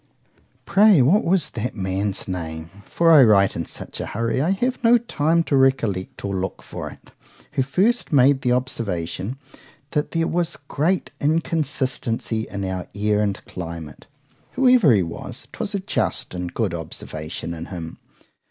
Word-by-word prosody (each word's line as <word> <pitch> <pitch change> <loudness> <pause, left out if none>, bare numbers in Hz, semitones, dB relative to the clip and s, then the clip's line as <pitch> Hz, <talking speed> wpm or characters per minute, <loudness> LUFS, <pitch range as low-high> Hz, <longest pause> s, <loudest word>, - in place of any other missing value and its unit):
Pray 200 -3 +6
what 185 - +4
was 170 -4 +1
that 120 +2 -4
man's 95 0 -2
name,—for 90 - -1
I 150 -4 +9
write 100 -4 +4
in 85 - -3
such - - -8
a - - -4
hurry, 115 +4 -1
I 160 - +1
have 245 +7 -1
no 235 +1 +6
time 170 -8 +1
to 145 - 0
recollect 125 -11 +1
or 100 -1 -2
look 95 0 -4
for - - -6
it,——who - - -8
first 190 - +1
made 135 -1 +5
the 125 - +1
observation, 115 -4 -2 0.5
"That 150 -1 0
there 165 -1 0
was 170 0 -1
great 165 +7 0
inconstancy 140 -7 -1
in 100 -1 -4
our 95 -1 -4
air 105 0 +1
and 100 -2 -2
climate?" 85 -4 -8 0.5
Whoever 250 - +5
he 100 -5 +4
was, 85 - -8
'twas 200 - -4
a - - 0
just 190 - -1
and 90 -1 -4
good 105 -5 -1
observation 80 0 -5
in 85 0 -7
him. 85 -3 -7
120 Hz, 150 wpm, -22 LUFS, -, 0.5 s, I